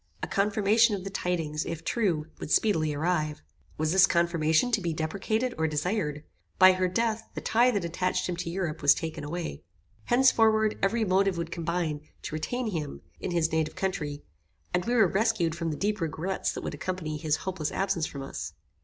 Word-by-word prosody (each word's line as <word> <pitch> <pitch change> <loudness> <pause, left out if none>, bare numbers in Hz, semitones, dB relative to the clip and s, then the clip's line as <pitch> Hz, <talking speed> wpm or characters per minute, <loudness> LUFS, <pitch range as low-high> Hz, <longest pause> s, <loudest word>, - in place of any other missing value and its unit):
A - - -1
confirmation 210 +2 +3
of 190 - -6
the 195 - -5
tidings, 165 -5 -1
if 165 -1 -5
true, 180 -10 0
would - - -6
speedily 160 -6 +2
arrive. 155 0 -1 0.3
Was 155 0 0
this 190 +1 +6
confirmation 170 +4 +2
to 215 -3 +2
be 170 -2 -1
deprecated 200 +10 -1
or 160 - +2
desired? 150 -1 -1 0.3
By 185 0 +9
her 185 0 +1
death, 225 +3 -1
the - - -2
tie 240 +3 +3
that 205 -8 0
attached 180 +2 -1
him 180 - -2
to 170 -1 -3
Europe, 170 -3 -3
was 145 0 +6
taken 160 -2 -5
away. 165 +3 -4 0.4
Henceforward 225 -4 +4
every 220 +3 +2
motive 190 -1 +2
would 170 0 -3
combine 165 -3 -2 0.2
to - - -6
retain 225 +9 -2
him 155 -5 -4 0.2
in - - -3
his 170 -2 +1
native 160 -1 0
country, 150 -7 -3 0.5
and 180 0 +1
we 240 - +1
were 220 -5 +6
rescued 195 -4 +1
from 165 0 -3
the 150 - -3
deep 205 -1 -1
regrets 165 +4 -2
that - - -6
would - - -4
accompany 175 -5 -3
his 155 -1 0
hopeless 185 -5 -2
absence 180 -4 0
from 140 -1 -7
us. 135 - -6
180 Hz, 190 wpm, -28 LUFS, 160-200 Hz, 0.5 s, By